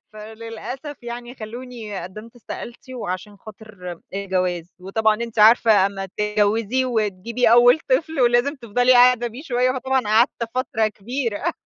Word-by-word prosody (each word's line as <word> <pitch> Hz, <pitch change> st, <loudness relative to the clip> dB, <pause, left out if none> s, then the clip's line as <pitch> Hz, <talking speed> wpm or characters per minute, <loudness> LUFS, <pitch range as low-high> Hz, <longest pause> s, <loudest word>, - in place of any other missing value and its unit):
فللأسف 230 Hz, +6 st, -8 dB
يعني 240 Hz, +1 st, -7 dB
خَلّونِي 230 Hz, -3 st, -7 dB
قدّمت 215 Hz, +7 st, -10 dB
استقالتي 240 Hz, +2 st, -9 dB
وعشان 205 Hz, -3 st, -5 dB
خاطر 200 Hz, -4 st, -10 dB, 0.2 s
الجواز، 180 Hz, -3 st, -2 dB
وطبعًا 215 Hz, +4 st, +1 dB
أنتِ 230 Hz, 0 st, -6 dB
عارفة 215 Hz, -2 st, +6 dB
أمّا 195 Hz, -1 st, -5 dB
تتجوّزي 210 Hz, +5 st, 0 dB
وتجيبي 225 Hz, 0 st, 0 dB
أول 245 Hz, +5 st, +7 dB
طفل، 320 Hz, -, +1 dB
ولازم 240 Hz, +3 st, +3 dB
تفضلي 245 Hz, +1 st, +2 dB
قاعدة 245 Hz, -1 st, +5 dB
بيه 240 Hz, +5 st, -8 dB
شوية 255 Hz, -4 st, +1 dB
فطبعًا 265 Hz, +1 st, 0 dB
قعدت 230 Hz, +3 st, +2 dB
فترة 225 Hz, -3 st, 0 dB
كبيرة. 230 Hz, +1 st, -3 dB
230 Hz, 130 wpm, -22 LUFS, 210-245 Hz, 0.2 s, أول